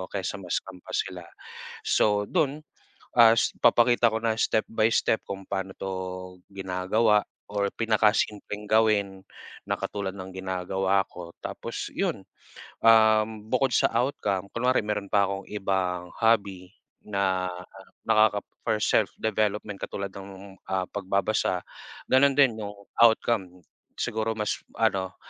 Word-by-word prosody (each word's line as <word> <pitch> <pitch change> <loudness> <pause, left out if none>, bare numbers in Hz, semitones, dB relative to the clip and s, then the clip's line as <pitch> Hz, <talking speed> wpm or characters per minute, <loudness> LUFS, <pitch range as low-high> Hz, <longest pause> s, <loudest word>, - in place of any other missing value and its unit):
kaysa 100 +1 -3
ma-scam 90 +1 -4
pa - - -11
sila. 90 -2 -3 0.6
So, 105 -1 +2
dun, 155 -4 0 0.6
ah, 115 -1 +8 0.3
papakita 120 0 +5
ko 110 - +1
na 115 -1 +2
step 110 - +2
by 110 0 +3
step 110 -1 +2
kung 95 -1 -6
pano 95 -1 -3
to 95 0 -4 0.6
ginagawa, 100 +3 +1 0.3
or 100 -1 0
pinaka-simpleng 105 -1 0
gawin 100 -3 +2 0.4
na - - 0
katulad 100 -2 -3
ng 95 -1 -9
ginagawa 95 +1 0
ko. 85 -1 -10
Tapos - - -5
yun, - - -2 0.6
um, 110 -1 +6 0.2
bukod 130 -1 +2
sa - - +3
outcome, 105 -6 -1
kunwari 125 0 +2
meron 105 -2 -3
pa 100 -1 +4
akong 100 0 -4
ibang 95 -3 -2
hobby 100 -5 +1 0.3
na 95 -2 -1 0.6
nakaka 110 -1 +4 0.2
for 110 -2 0
self - - +2
development 105 -2 -1
katulad 100 -1 -4
nung, 95 0 -10
ah, 95 -1 -1
pagbabasa, 100 -1 0 0.5
ganun 135 +1 +5
din, 135 -5 +5
yung 105 -1 -5 0.3
outcome. 100 -6 +2 0.4
Siguro 110 0 -1
mas 105 -1 -1 0.2
ano 95 -1 0
100 Hz, 125 wpm, -26 LUFS, 95-110 Hz, 0.6 s, ah